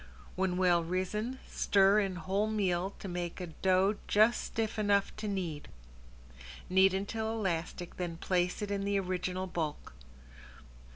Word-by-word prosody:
When 185 -1 0
well 175 -2 +3
risen 190 +8 -2
stir 200 +1 +4
in 195 -3 -1
whole 195 +4 0
meal 195 -3 0
to - - -7
make 175 -1 -4
a 180 - -3
dough 190 +4 +2
just 215 +3 +4
stiff 220 -1 -3
enough 205 -1 +2
to 215 0 -4
knead. 175 -7 -3 1.0
Knead 190 0 +5
until 220 +3 -2
elastic 175 -5 -3
then 175 -2 -3
place 180 +3 0
it 205 - -3
in 200 -1 -1
the 200 0 +1
original 185 0 -2
bulk. 160 - -4
190 Hz, 140 wpm, -32 LUFS, 180-205 Hz, 1.0 s, Knead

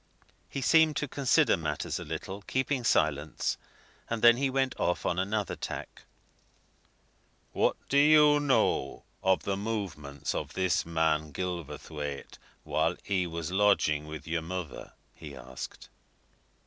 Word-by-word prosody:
He 135 - -4
seemed 160 +3 +5
to 145 - -1
consider 140 +3 +3
matters 75 -4 -3
a - - -5
little, 95 +2 -6
keeping 130 +3 -1
silence, 75 -7 +1 0.5
and 115 -1 -3
then 120 0 +8
he 135 +1 +1
went 130 0 +1
off 90 - 0
on 90 - 0
another 100 +1 -1
tack. - - -7 1.5
"What - - +2
do 140 - +3
you 150 0 +6
know 145 -2 +1 0.2
of 95 -1 +2
the 100 - -1
movements 95 -10 -4
of - - -4
this 95 -3 +1
man 80 -2 +1
Gilverthwaite 75 -3 -5 0.2
while 80 +3 0
he 95 -3 0
was 85 0 -4
lodging 95 -7 +2
with 75 0 -7
your 80 0 -1
mother?" 85 -2 -6 0.2
he 75 -3 -10
asked. 65 0 -8
90 Hz, 135 wpm, -29 LUFS, 80-125 Hz, 1.5 s, then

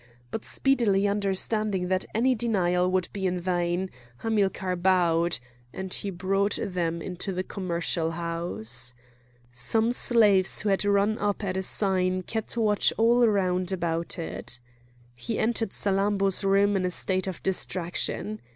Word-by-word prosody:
But 225 - -4
speedily 220 -7 +2
understanding 200 -1 0
that 185 0 0
any 255 +4 +3
denial 185 -6 +1
would 185 -1 0
be 195 -2 -1
in 180 0 -1
vain, 175 +1 -1 0.3
Hamilcar 195 -4 0
bowed; 175 -3 +2 0.3
and 190 +4 -5
he 200 - -2
brought 195 +2 0
them 170 -3 -2
into 185 +2 -4
the 185 0 -2
commercial 170 -4 -1
house. 165 -8 -2 0.6
Some 220 - 0
slaves 210 -6 +4
who 210 - -1
had 195 0 +2
run 205 +2 +2
up 205 0 -1
at 185 -2 -2
a 190 - 0
sign 185 -1 +1
kept 220 +4 -4
watch 210 -3 +3
all 235 +1 +4
round 185 -3 0
about 170 -2 -2
it. 160 -6 -5 0.5
He 165 - -4
entered 225 -1 +1
Salammbô's 195 -1 +1
room 200 +1 +3
in 190 - 0
a 180 - +1
state 185 +1 -1
of 185 - -6
distraction. 190 +3 -2
190 Hz, 140 wpm, -26 LUFS, 180-205 Hz, 0.6 s, slaves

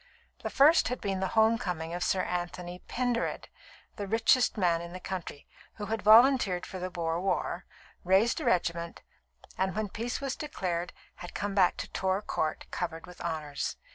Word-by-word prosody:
The - - -3
first 300 +5 +5
had 250 - -2
been 195 -2 -2
the 190 - 0
home 220 +1 +5
coming 170 -6 -3
of 175 0 -2
Sir 185 -1 +1
Anthony 175 0 -4
Pendered, 245 -1 -1 0.5
the 205 - -4
richest 225 +3 +3
man 170 -4 +2
in 170 0 -8
the 185 - -6
county, 180 -6 -6 0.3
who 210 - -5
had 220 +1 -2
volunteered 220 -4 +6
for 185 - -7
the 185 +1 -3
Boer 170 -1 -2
war, 195 - -1 0.4
raised 190 +6 +3
a - - -4
regiment, 170 -1 0 0.6
and, 190 -1 0
when 215 -1 -1
peace 230 +5 -3
was 275 -2 -3
declared, 180 - -3 0.3
had 175 - -9
come 205 -1 -2
back 190 -3 +3
to - - -4
Torr 190 +2 0
Court 155 -6 -2
covered 165 -2 -4
with 180 - -13
honours. 155 -4 -3
185 Hz, 175 wpm, -30 LUFS, 175-220 Hz, 0.6 s, volunteered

